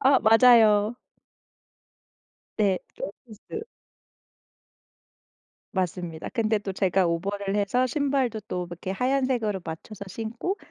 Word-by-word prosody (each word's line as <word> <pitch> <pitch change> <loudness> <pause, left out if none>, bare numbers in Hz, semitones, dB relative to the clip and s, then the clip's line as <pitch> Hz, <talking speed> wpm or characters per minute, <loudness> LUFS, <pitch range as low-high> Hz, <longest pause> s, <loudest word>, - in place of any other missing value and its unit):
아 270 0 +5
맞아요. 225 -1 +6 1.6
네. 195 -3 +2 0.2
원피스. 225 - -8 2.1
맞습니다. 175 -3 -3
근데 220 -3 +1
또 200 -1 -5
제가 190 -1 +2
오버를 195 +4 -2
해서 245 +5 +2
신발도 270 -5 0
또 - - -4
뭐 - - -16
이렇게 175 +2 -6
하얀색으로 250 -3 0
맞춰서 185 +6 -7
신고 230 - -4
215 Hz, 225 characters per minute, -26 LUFS, 190-250 Hz, 2.1 s, 맞아요